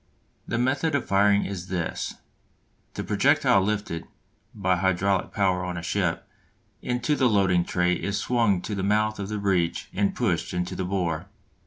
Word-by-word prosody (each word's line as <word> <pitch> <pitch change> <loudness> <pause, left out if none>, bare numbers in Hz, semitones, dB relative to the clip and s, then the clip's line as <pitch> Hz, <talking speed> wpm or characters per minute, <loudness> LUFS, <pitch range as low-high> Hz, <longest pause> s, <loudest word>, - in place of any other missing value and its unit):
The - - -1
method 140 +6 +1
of 140 - 0
firing 100 +1 +3
is 95 -2 -5
this: 90 -3 -3 0.8
The - - -3
projectile 95 - +3
lifted 100 -5 -2 0.4
(by 95 -3 0
hydraulic 95 +1 +1
power 95 -3 +1
on 90 -1 -4
a 85 - -5
ship) - - -1 0.5
into 125 +4 0
the 130 -3 +3
loading 95 -4 +3
tray 90 0 +1
is 100 +2 -2
swung 105 -5 +1
to 110 - -4
the 100 - -2
mouth 105 +2 +1
of 100 0 -4
the 105 - -2
breech 95 -4 0
and 100 0 0
pushed - - -1
into 90 +1 -2
the 95 - -2
bore. 90 -2 -2
100 Hz, 165 wpm, -25 LUFS, 90-105 Hz, 0.8 s, firing